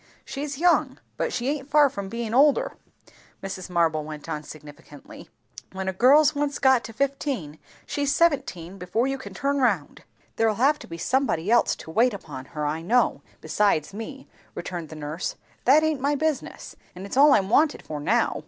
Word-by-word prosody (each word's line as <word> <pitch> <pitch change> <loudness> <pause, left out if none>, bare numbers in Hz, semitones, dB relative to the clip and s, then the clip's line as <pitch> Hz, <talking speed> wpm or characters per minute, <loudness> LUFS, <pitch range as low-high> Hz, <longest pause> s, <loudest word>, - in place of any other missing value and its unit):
"She's 280 0 -5
young, 350 +3 +2 0.2
but - - -2
she 245 - -2
aint 285 -1 -3
far 295 0 +6
from 200 -7 -6
bein' 230 0 -4
older," 295 - +4 0.7
Mrs. 190 -1 -6
Marble 165 -3 +1
went 150 0 -9
on 155 -2 -3
significantly. 150 -1 -13 0.4
"When 190 0 -4
a 190 - -1
girl's 280 +9 +5
once 285 -1 -1
got 265 -3 +4
to - - -8
fifteen, 260 - -3 0.3
she's 285 -1 -1
seventeen 195 - 0
before 180 +7 -1
you 270 0 -2
can 260 - -10
turn 280 0 0
round." 205 - 0 0.4
"There'll 225 -1 +2
have 280 +7 +2
to - - -11
be 165 - -7
somebody 220 -5 0
else 240 - +4
to 160 - -11
wait 230 +5 +3
upon 135 -9 -9
her, 150 - -1
I 155 +2 -2
know, 240 +9 +1 0.2
besides 195 -6 +1
me," 265 +6 -8 0.3
returned 170 -4 -6
the 155 - -9
nurse. 155 +3 -4 0.3
"That 290 +5 +6
aint 310 -4 0
my 285 +2 +1
business. 310 0 -3 0.2
And 185 +2 -8
it's 200 - -6
all 285 +1 +7
I'm 195 -1 +2
wanted 300 +4 +3
for 150 -1 -6
now. 145 - +1
230 Hz, 180 wpm, -25 LUFS, 170-280 Hz, 0.7 s, all